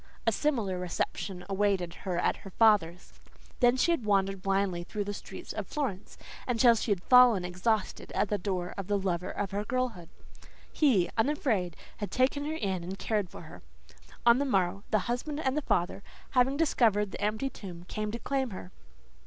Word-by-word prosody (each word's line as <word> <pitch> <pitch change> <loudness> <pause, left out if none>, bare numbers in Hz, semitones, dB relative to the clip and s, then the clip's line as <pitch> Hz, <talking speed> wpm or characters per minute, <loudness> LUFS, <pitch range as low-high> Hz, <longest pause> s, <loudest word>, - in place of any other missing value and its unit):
A 225 - +4
similar 220 -7 0
reception 180 +1 -3
awaited 195 -3 0
her 180 -1 -4
at 175 - +1
her 195 - -11
father's. 195 -5 +2 0.5
Then 245 0 +4
she 335 +7 +3
had 335 -8 0
wandered 195 -2 +1
blindly 195 -2 0
through 205 +4 -4
the 205 0 -4
streets - - -8
of - - -4
Florence 240 -10 -4 0.3
until 240 -1 +5
she 225 0 -2
had 190 -3 0
fallen 245 -7 +6
exhausted 195 +5 -1
at - - +1
the 210 - 0
door 180 -1 -3
of 195 - -5
the 205 -1 +1
lover 185 -2 -2
of 205 - -3
her 200 +1 -2
girlhood. 240 -8 -2 0.6
He, 230 - +3
unafraid, 225 - +1 0.2
had 205 - -4
taken 270 +3 +1
her 310 +1 -2
in 190 - -2
and 185 +3 -6
cared 210 -4 -1
for - - -10
her. - - -12 0.6
On 235 +1 +6
the - - +2
morrow, 195 -7 +1
the 215 - +3
husband 270 +5 -2
and 285 0 0
father, 175 +3 0 0.3
having 265 +2 +3
discovered 220 -10 +2
the - - -7
empty 215 +6 -1
tomb, 180 -6 -9
came 215 +1 -3
to 235 - -3
claim 265 +1 -1
her. 185 -2 -8
205 Hz, 180 wpm, -29 LUFS, 185-245 Hz, 0.6 s, fallen